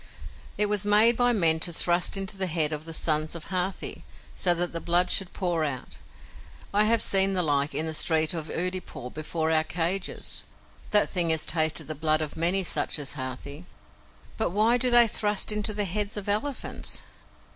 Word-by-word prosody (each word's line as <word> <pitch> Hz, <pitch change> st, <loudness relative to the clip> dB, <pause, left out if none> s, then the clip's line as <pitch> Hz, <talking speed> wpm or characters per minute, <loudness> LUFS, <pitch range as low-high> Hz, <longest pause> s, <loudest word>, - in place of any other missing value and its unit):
"It 210 Hz, -, +3 dB
was 205 Hz, -2 st, +1 dB
made 210 Hz, +3 st, +4 dB
by 245 Hz, +1 st, +2 dB
men 165 Hz, -8 st, +2 dB
to 175 Hz, -, 0 dB
thrust 175 Hz, +3 st, +1 dB
into 195 Hz, +1 st, -4 dB
the 190 Hz, -1 st, 0 dB
head 155 Hz, -2 st, 0 dB
of 150 Hz, +1 st, -6 dB
the 165 Hz, -, -8 dB
sons 155 Hz, 0 st, -1 dB
of 165 Hz, -, -7 dB
Hathi, 185 Hz, 0 st, -3 dB, 0.3 s
so 175 Hz, -2 st, +2 dB
that 175 Hz, 0 st, -2 dB
the 165 Hz, -, -3 dB
blood 175 Hz, +2 st, +2 dB
should 190 Hz, -2 st, 0 dB
pour 175 Hz, -4 st, -2 dB
out. 140 Hz, -4 st, -5 dB, 0.7 s
I 210 Hz, +1 st, +4 dB
have 230 Hz, +1 st, +2 dB
seen 195 Hz, 0 st, +4 dB
the 180 Hz, -1 st, +1 dB
like 145 Hz, -1 st, 0 dB
in 155 Hz, -, +1 dB
the 160 Hz, -, -4 dB
street 160 Hz, 0 st, +2 dB
of 160 Hz, -2 st, -5 dB
Oodeypore, 180 Hz, -8 st, -4 dB
before 160 Hz, +1 st, -3 dB
our 155 Hz, -1 st, +2 dB
cages. 175 Hz, +4 st, -3 dB, 0.5 s
That 210 Hz, -1 st, +2 dB
thing 175 Hz, -3 st, +2 dB
has 160 Hz, -1 st, +3 dB
tasted 160 Hz, -1 st, +2 dB
the 155 Hz, -, -6 dB
blood 155 Hz, +1 st, +1 dB
of 150 Hz, -, -6 dB
many 175 Hz, +4 st, +2 dB
such 170 Hz, -, -1 dB
as 145 Hz, -2 st, -3 dB
Hathi." 135 Hz, +5 st, -7 dB, 0.7 s
"But 220 Hz, -, 0 dB
why 215 Hz, +6 st, +2 dB
do 250 Hz, +1 st, +1 dB
they 240 Hz, -1 st, +7 dB
thrust 210 Hz, -1 st, +1 dB
into 210 Hz, 0 st, -1 dB
the 205 Hz, -1 st, -1 dB
heads 205 Hz, +3 st, -3 dB
of 205 Hz, -, -5 dB
elephants?" 215 Hz, +7 st, -3 dB
175 Hz, 190 wpm, -26 LUFS, 160-205 Hz, 0.7 s, they